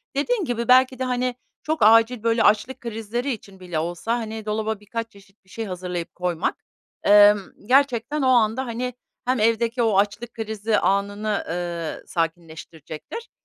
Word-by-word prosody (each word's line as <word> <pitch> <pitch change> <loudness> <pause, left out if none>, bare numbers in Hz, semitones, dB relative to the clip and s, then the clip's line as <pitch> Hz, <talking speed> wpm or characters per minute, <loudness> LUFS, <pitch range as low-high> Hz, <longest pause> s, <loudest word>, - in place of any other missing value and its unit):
dediğin 385 - 0
gibi 235 -2 -2
belki 255 0 +5
de, - - 0
hani, 250 -1 -1 0.3
çok 315 +1 -1
acil, 225 +1 +5
böyle, 230 0 +2
açlık 215 +5 +2
krizleri 235 +3 -3
için 200 -4 -8
bile 175 -4 -3
olsa, 175 +8 -2
hani, 220 -1 -6
dolaba 215 0 -2
birkaç 230 +2 -5
çeşit 200 0 -21
bir - - -26
şey 225 +2 -5
hazırlayıp 180 -3 -5
koymak, 180 0 -1 0.5
emm, 205 0 +7 0.3
gerçekten 275 +3 +2
o 265 - +2
anda, 240 0 +3
hani, 245 +1 -3 0.3
hem 255 0 +1
evdeki 230 +2 +1
o 215 -4 +2
açlık 210 +4 0
krizi 220 -1 -1
anını, 205 +1 0
eee, 170 -1 -4
sakinleştirecektir 165 - -5
220 Hz, 150 wpm, -23 LUFS, 195-245 Hz, 0.5 s, emm